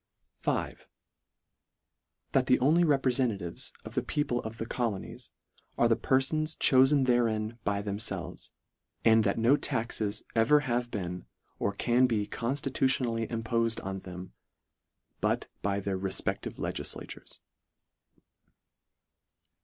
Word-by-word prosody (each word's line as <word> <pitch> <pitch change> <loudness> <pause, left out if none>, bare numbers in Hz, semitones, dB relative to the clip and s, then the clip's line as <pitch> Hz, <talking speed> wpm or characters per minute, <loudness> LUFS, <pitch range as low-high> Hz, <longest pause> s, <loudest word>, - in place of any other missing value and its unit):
V. - - 0 0.7
" - - -54
That - - +2
the - - +5
only 155 +7 +4
reprefentatives 125 - 0
of - - -8
the - - +1
people 135 -5 -1
of 110 +1 -7
the 115 - -3
colonies, 115 -5 -4 0.5
are 120 - +4
the 115 - +4
perfons 155 +6 +1
cho 130 -1 +6
fen 140 -1 +3
therein 115 -2 +1
by 100 0 -1
themfelves; 100 -3 -4 0.6
and 110 -1 +6
that 100 - +1
no 115 +5 +5
taxes 115 -7 -2
ever 120 +7 +5
have 120 -3 -1
been, 90 -5 -4 0.3
or 100 - +1
can 120 +5 +3
be 110 -4 0
conStitution 130 +2 0
ally 115 -1 -1
impofed 115 0 0
on 95 0 -3
them, 90 0 -9 0.9
but - - 0 0.2
by 100 0 0
their 95 -1 -2
refpe&ive 95 0 -2
legiilatures." - - -5
115 Hz, 120 wpm, -30 LUFS, 100-130 Hz, 0.9 s, cho